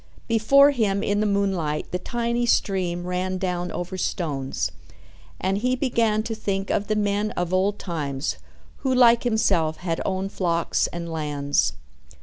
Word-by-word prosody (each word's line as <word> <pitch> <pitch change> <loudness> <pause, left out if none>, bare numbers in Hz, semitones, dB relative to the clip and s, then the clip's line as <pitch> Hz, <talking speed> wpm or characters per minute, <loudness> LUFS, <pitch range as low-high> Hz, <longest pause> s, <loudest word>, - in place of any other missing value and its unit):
Before 275 +6 +5
him 210 -7 0
in 205 0 +1
the 215 - +2
moonlight 190 -7 -1
the 180 - -1
tiny 235 +3 -1
stream 180 -5 +1
ran 185 +1 -2
down 180 -1 -2
over 180 +2 -4
stones, 140 - -2 0.7
and 190 +2 0
he 250 +3 +1
began 230 -5 +1
to 225 - -3
think 195 -3 -2
of 205 - 0
the 215 - +1
men 205 0 0
of 180 0 -1
old 195 +2 +2
times 145 -5 -3 0.4
who 265 - -1
like 235 -2 +6
himself 185 -9 +2
had 170 -2 -3
owned 190 +1 -2
flocks 170 -2 0
and 170 -1 -6
lands. 150 -3 0
190 Hz, 150 wpm, -24 LUFS, 175-215 Hz, 0.7 s, like